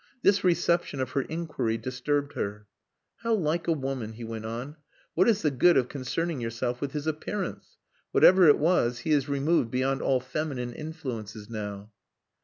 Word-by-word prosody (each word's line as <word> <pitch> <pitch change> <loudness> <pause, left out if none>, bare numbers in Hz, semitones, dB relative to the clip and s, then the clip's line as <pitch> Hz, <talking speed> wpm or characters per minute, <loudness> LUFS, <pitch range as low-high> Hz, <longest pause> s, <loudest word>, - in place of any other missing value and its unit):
This 200 0 +4
reception 170 -4 +2
of 130 -1 -2
her 135 - +1
inquiry 155 -7 -2
disturbed 140 +4 -2
her. 105 +1 -4 0.5
"How 230 -1 +1
like 170 -3 -1
a - - +3
woman," 135 -7 -3
he 115 +2 -9
went 110 -1 -6
on. 125 +7 -6 0.4
"What 185 +6 +4
is 215 -2 +2
the 150 - +3
good 170 +7 +5
of 125 -2 +2
concerning 145 +2 -2
yourself 120 +2 -3
with 140 -1 -3
his 150 -1 -3
appearance? 160 +6 -4 0.3
Whatever 185 -2 +7
it 145 - +7
was, 125 -8 +2
he 160 - -2
is 145 -2 +2
removed 140 -2 +2
beyond 130 +2 0
all 130 -1 +2
feminine 130 -2 -3
influences 115 -9 -6
now." 105 -1 -6
135 Hz, 170 wpm, -28 LUFS, 120-160 Hz, 0.5 s, Whatever